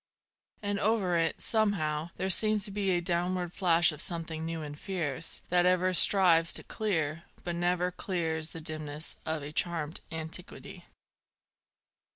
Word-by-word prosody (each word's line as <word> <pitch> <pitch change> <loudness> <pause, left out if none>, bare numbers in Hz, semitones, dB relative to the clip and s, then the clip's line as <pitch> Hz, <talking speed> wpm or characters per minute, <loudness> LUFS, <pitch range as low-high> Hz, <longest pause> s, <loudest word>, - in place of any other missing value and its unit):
And 205 0 -1
over 200 -5 +1
it, 165 -1 0
somehow, 175 -8 0
there 190 +1 -1
seems 215 +1 +5
to 205 - -1
be 200 -1 -1
A 175 -2 +1
downward 175 0 -1
flash 170 -3 +3
of 150 0 -7
something 165 -2 -2
new 165 -1 -4
and 145 -1 -7
fierce, 165 -4 -3
That 180 0 +3
ever 185 0 +2
strives 175 -3 +6
to - - -1
clear, 165 -6 -2 0.2
but 175 - -3
never 175 +1 0
clears 165 -4 -3
The 165 - -8
dimness 155 -1 -4
of 160 -2 -2
a 145 - -6
charmed 160 -1 -1
antiquity. 160 +2 -8
170 Hz, 150 wpm, -29 LUFS, 160-185 Hz, 0.2 s, strives